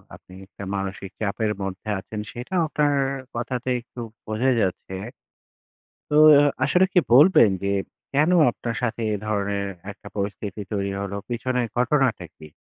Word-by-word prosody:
আপনি 95 Hz, -, -17 dB
একটা 100 Hz, -, -11 dB
মানসিক 95 Hz, 0 st, -4 dB
চাপের 105 Hz, +1 st, 0 dB
মধ্যে 95 Hz, +2 st, -5 dB
আছেন। 105 Hz, +2 st, -7 dB
সেটা 125 Hz, +10 st, -8 dB
আপনার 150 Hz, -1 st, +1 dB, 0.4 s
কথাতে 125 Hz, +1 st, -3 dB
একটু 120 Hz, +1 st, -13 dB, 0.3 s
বোঝাই 120 Hz, +5 st, +1 dB
যাচ্ছে। 95 Hz, 0 st, -2 dB, 1.1 s
তো 150 Hz, -, 0 dB, 0.5 s
আসলে 185 Hz, +1 st, +4 dB
কি 180 Hz, -, +6 dB
বলবেন? 140 Hz, -, +7 dB
যে 100 Hz, -, 0 dB, 0.4 s
কেন 150 Hz, +4 st, +3 dB, 0.2 s
আপনার 115 Hz, -1 st, -5 dB
সাথে 120 Hz, 0 st, -1 dB
এ -, -, +1 dB
ধরনের 100 Hz, -1 st, -1 dB, 0.2 s
একটা 100 Hz, -, -14 dB
পরিস্থিতি 100 Hz, 0 st, -4 dB
তৈরি 100 Hz, -1 st, -1 dB
হল, 100 Hz, -1 st, -4 dB, 0.2 s
পিছনের 125 Hz, +1 st, -1 dB
ঘটনাটা 125 Hz, -6 st, +1 dB
কী? 75 Hz, -, -12 dB
110 Hz, 140 wpm, -24 LUFS, 100-125 Hz, 1.1 s, বলবেন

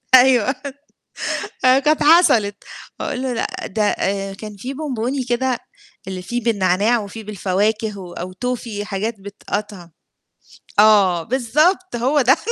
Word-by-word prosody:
أيوه. 255 Hz, 0 st, +5 dB, 1.1 s
آآ 255 Hz, +1 st, +6 dB
كانت 300 Hz, +2 st, +2 dB
حصلت. 290 Hz, -, +5 dB, 0.4 s
أقول 255 Hz, -, -3 dB
له 260 Hz, -1 st, -1 dB
لأ 230 Hz, -, -1 dB, 0.2 s
ده 215 Hz, +2 st, -2 dB
آآ 195 Hz, -1 st, -1 dB
كان 210 Hz, +1 st, -9 dB
في 255 Hz, +7 st, -6 dB
بونبوني 265 Hz, -2 st, -2 dB
كده 245 Hz, 0 st, 0 dB, 0.5 s
اللي 185 Hz, -1 st, -5 dB
فيه 240 Hz, +6 st, -3 dB
بالنعناع 205 Hz, +1 st, +2 dB
وفيه 215 Hz, +1 st, -7 dB
بالفواكه 210 Hz, +2 st, -1 dB
و 180 Hz, -2 st, -9 dB
أو 180 Hz, +2 st, -6 dB
توفي 230 Hz, -1 st, -4 dB
حاجات 210 Hz, +3 st, -3 dB
بتتقطع، 200 Hz, -2 st, -6 dB, 0.9 s
آه 200 Hz, -5 st, +5 dB
بالضبط، 290 Hz, -, +1 dB
هو 265 Hz, +5 st, +2 dB
ده 260 Hz, +2 st, +4 dB
220 Hz, 130 wpm, -20 LUFS, 200-255 Hz, 1.1 s, آآ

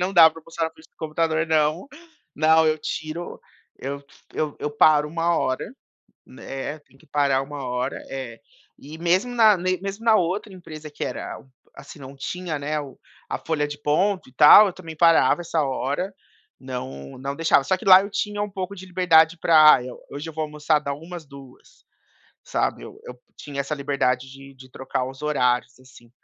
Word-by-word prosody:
Não 185 Hz, +2 st, -1 dB
dá 165 Hz, -3 st, +8 dB
pra 160 Hz, -, -13 dB
almoçar 165 Hz, +1 st, -4 dB
na 160 Hz, -, -3 dB
frente 160 Hz, 0 st, -20 dB
do -, -, -53 dB
computador, 160 Hz, 0 st, -1 dB
não. 155 Hz, -, +1 dB, 0.5 s
Não, 160 Hz, +1 st, +4 dB
eu 155 Hz, 0 st, +1 dB
tiro 155 Hz, +3 st, -6 dB, 0.4 s
eu 140 Hz, +1 st, -6 dB, 0.6 s
eu 150 Hz, -, -3 dB
paro 150 Hz, 0 st, +4 dB
uma 170 Hz, +1 st, 0 dB
hora, 130 Hz, -, -2 dB, 0.5 s
né, 135 Hz, +3 st, -7 dB
tem 135 Hz, -2 st, -26 dB
que -, -, -23 dB
parar 140 Hz, -2 st, +1 dB
uma 140 Hz, 0 st, -7 dB
hora, 125 Hz, +2 st, -3 dB
é. 130 Hz, -4 st, -7 dB, 0.4 s
E 150 Hz, +3 st, -11 dB
mesmo 185 Hz, +9 st, +1 dB
na 220 Hz, -3 st, +6 dB
mesmo 185 Hz, +4 st, -3 dB
na 225 Hz, -1 st, +6 dB
outra 190 Hz, +2 st, -1 dB
empresa 155 Hz, -4 st, -10 dB
que 150 Hz, -, -6 dB
era, -, -, -5 dB, 0.4 s
assim, 150 Hz, -, -12 dB
não 135 Hz, 0 st, -11 dB
tinha, 165 Hz, +4 st, -4 dB
né, 150 Hz, +2 st, -2 dB
o 140 Hz, -2 st, -9 dB, 0.3 s
a -, -, -2 dB
folha 150 Hz, -2 st, -2 dB
de 145 Hz, 0 st, -7 dB
ponto 180 Hz, +4 st, 0 dB
e -, -, -25 dB
tal, 155 Hz, +9 st, +8 dB
eu 185 Hz, -, -5 dB
também 165 Hz, -4 st, -10 dB
parava 165 Hz, +1 st, +4 dB
essa 165 Hz, -1 st, -1 dB
hora. 140 Hz, +8 st, -2 dB, 0.5 s
Não, 70 Hz, -, -7 dB
não 140 Hz, +2 st, -5 dB
deixava. 160 Hz, -3 st, +3 dB
Só 190 Hz, -, +1 dB
que 185 Hz, -, -11 dB
lá 190 Hz, -2 st, +8 dB
eu 200 Hz, -, -6 dB
tinha 205 Hz, 0 st, -3 dB
um 210 Hz, -, -2 dB
pouco 190 Hz, 0 st, -5 dB
de 190 Hz, -1 st, -10 dB
liberdade 175 Hz, -2 st, +3 dB
pra, 155 Hz, -5 st, +6 dB
eh, 125 Hz, -, -7 dB, 0.2 s
hoje 145 Hz, +3 st, -7 dB
eu -, -, -10 dB
vou 160 Hz, 0 st, -2 dB
almoçar 150 Hz, 0 st, 0 dB
da 140 Hz, -1 st, -4 dB
1 165 Hz, +5 st, -9 dB
às 165 Hz, -, -12 dB
2, 140 Hz, -2 st, -16 dB, 0.6 s
sabe? -, -, -2 dB
Eu -, -, -12 dB
eu 125 Hz, 0 st, -11 dB, 0.2 s
tinha 140 Hz, -1 st, -6 dB
essa 140 Hz, +2 st, -3 dB
liberdade 135 Hz, -3 st, -1 dB
de 135 Hz, 0 st, -13 dB
de 130 Hz, 0 st, -15 dB
trocar 130 Hz, 0 st, -3 dB
os 130 Hz, +1 st, -9 dB
horários 125 Hz, -4 st, 0 dB
em 130 Hz, -, -20 dB
cima. 120 Hz, -2 st, -18 dB
155 Hz, 190 wpm, -23 LUFS, 135-175 Hz, 0.6 s, dá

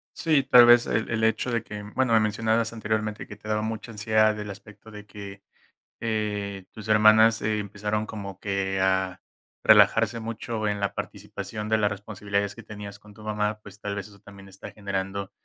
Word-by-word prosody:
Sí, 155 Hz, -5 st, +2 dB
tal 125 Hz, -2 st, +8 dB
vez, 120 Hz, 0 st, +6 dB
el 110 Hz, -, -1 dB
el 110 Hz, -1 st, -1 dB
hecho 110 Hz, +3 st, +1 dB
de 115 Hz, -1 st, 0 dB
que, 105 Hz, -2 st, -8 dB
bueno, 130 Hz, -3 st, +2 dB
me 110 Hz, -, +6 dB
mencionabas 110 Hz, +2 st, 0 dB
anteriormente 110 Hz, -1 st, -3 dB
que 105 Hz, -, -9 dB
te 105 Hz, +1 st, -14 dB
daba 105 Hz, 0 st, 0 dB
mucha 110 Hz, +1 st, -5 dB
ansiedad 110 Hz, 0 st, +2 dB
del 105 Hz, -1 st, -6 dB
aspecto 105 Hz, +2 st, -12 dB
de 105 Hz, -1 st, -10 dB
que, 100 Hz, -1 st, -10 dB, 0.6 s
eh, 105 Hz, -3 st, -3 dB
tus 110 Hz, -1 st, -10 dB
hermanas 110 Hz, +1 st, +6 dB
empezaron 105 Hz, 0 st, -2 dB
como 100 Hz, -3 st, -7 dB
que 100 Hz, -1 st, -1 dB
a 95 Hz, -1 st, +1 dB, 0.4 s
relajarse 115 Hz, +1 st, +5 dB
mucho 110 Hz, -1 st, -4 dB
en 105 Hz, 0 st, -1 dB
la 100 Hz, 0 st, -1 dB
participación 105 Hz, 0 st, -6 dB
de 110 Hz, -, +3 dB
las 105 Hz, -1 st, +1 dB
responsabilidades 100 Hz, 0 st, -3 dB
que -, -, -11 dB
tenías 105 Hz, -1 st, -9 dB
con 105 Hz, 0 st, -17 dB
tu 105 Hz, +1 st, -14 dB
mamá, 105 Hz, 0 st, -1 dB
pues, 100 Hz, 0 st, -13 dB
tal 100 Hz, -1 st, -3 dB
vez 100 Hz, -2 st, -5 dB
eso 100 Hz, -1 st, -17 dB
también 100 Hz, -1 st, -14 dB
está 95 Hz, 0 st, -11 dB
generando, 100 Hz, -1 st, -4 dB
105 Hz, 185 wpm, -26 LUFS, 100-110 Hz, 0.6 s, tal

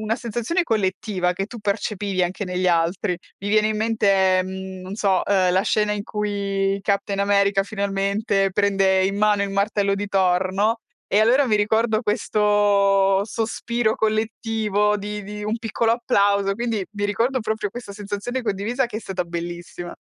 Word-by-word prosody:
una 220 Hz, +1 st, -1 dB
sensazione 240 Hz, -, -1 dB
collettiva, 190 Hz, -, -1 dB
che 195 Hz, -, -2 dB
tu 235 Hz, 0 st, -9 dB
percepivi 200 Hz, -2 st, -1 dB
anche 180 Hz, +3 st, -2 dB
negli 180 Hz, 0 st, -2 dB
altri. 175 Hz, +1 st, +1 dB, 0.2 s
Mi 200 Hz, -, -4 dB
viene 215 Hz, +1 st, +3 dB
in 215 Hz, -, -1 dB
mente, 195 Hz, -4 st, +2 dB
mhmm, 190 Hz, 0 st, -7 dB
non 185 Hz, +2 st, -7 dB
so, 195 Hz, -3 st, +2 dB
uhm, 185 Hz, -3 st, +2 dB
la 185 Hz, -, +3 dB
scena 210 Hz, -1 st, +1 dB
in 205 Hz, -1 st, -3 dB
cui 200 Hz, -2 st, -1 dB
Captain 200 Hz, 0 st, -1 dB
America 200 Hz, 0 st, +3 dB
finalmente 200 Hz, 0 st, 0 dB
prende 195 Hz, -1 st, +2 dB
in 195 Hz, +1 st, -1 dB
mano 210 Hz, -1 st, +3 dB
il 200 Hz, -, -5 dB
martello 200 Hz, 0 st, +1 dB
di 205 Hz, 0 st, -4 dB
Thor, 185 Hz, -1 st, +2 dB
no. 220 Hz, +4 st, +1 dB, 0.3 s
E 205 Hz, -, +4 dB
allora 255 Hz, +5 st, +4 dB
mi 215 Hz, -3 st, +2 dB
ricordo 220 Hz, +1 st, +1 dB
questo 205 Hz, -2 st, +2 dB
sospiro 225 Hz, +1 st, -1 dB
collettivo 215 Hz, -1 st, 0 dB
di 210 Hz, +1 st, -5 dB
di 210 Hz, +1 st, -7 dB
un 215 Hz, +2 st, -1 dB
piccolo 225 Hz, 0 st, 0 dB
applauso, 200 Hz, -4 st, +2 dB
quindi 225 Hz, -3 st, -2 dB
mi 205 Hz, -1 st, -4 dB
ricordo 235 Hz, +6 st, 0 dB
proprio 220 Hz, -1 st, -2 dB
questa 240 Hz, -2 st, -8 dB
sensazione 210 Hz, +5 st, -4 dB
condivisa 225 Hz, +4 st, -1 dB
che 220 Hz, -3 st, -7 dB
è -, -, -4 dB
stata 190 Hz, -4 st, -3 dB
bellissima. 175 Hz, +1 st, -6 dB
205 Hz, 165 wpm, -22 LUFS, 195-215 Hz, 0.3 s, E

